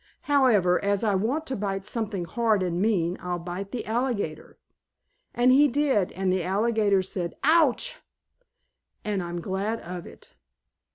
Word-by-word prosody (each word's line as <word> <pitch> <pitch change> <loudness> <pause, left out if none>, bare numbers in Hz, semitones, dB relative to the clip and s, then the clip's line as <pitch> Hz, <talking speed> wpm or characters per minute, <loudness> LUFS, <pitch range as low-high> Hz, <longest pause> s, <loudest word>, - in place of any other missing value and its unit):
However, 225 -12 +3
as 200 +1 +1
I 210 -2 +2
want 240 +12 -1
to 265 - -3
bite 195 -1 -3
something 210 -4 -2
hard 220 +1 +1
and 175 0 -1
mean 185 -5 +1
I'll 180 -1 -3
bite 180 +3 -6
the 245 - -4
alligator." 220 -9 -3 0.8
And 245 +1 +4
he 285 +3 +6
did 265 -8 +1
and 185 0 0
the 185 -2 0
alligator 205 +1 +1
said 180 -2 -3
"Ouch!" 320 - +3 1.1
and 205 -2 -1
I'm 175 0 -5
glad 195 +6 -2
of 175 0 -7
it. - - -15
200 Hz, 150 wpm, -26 LUFS, 180-235 Hz, 1.1 s, he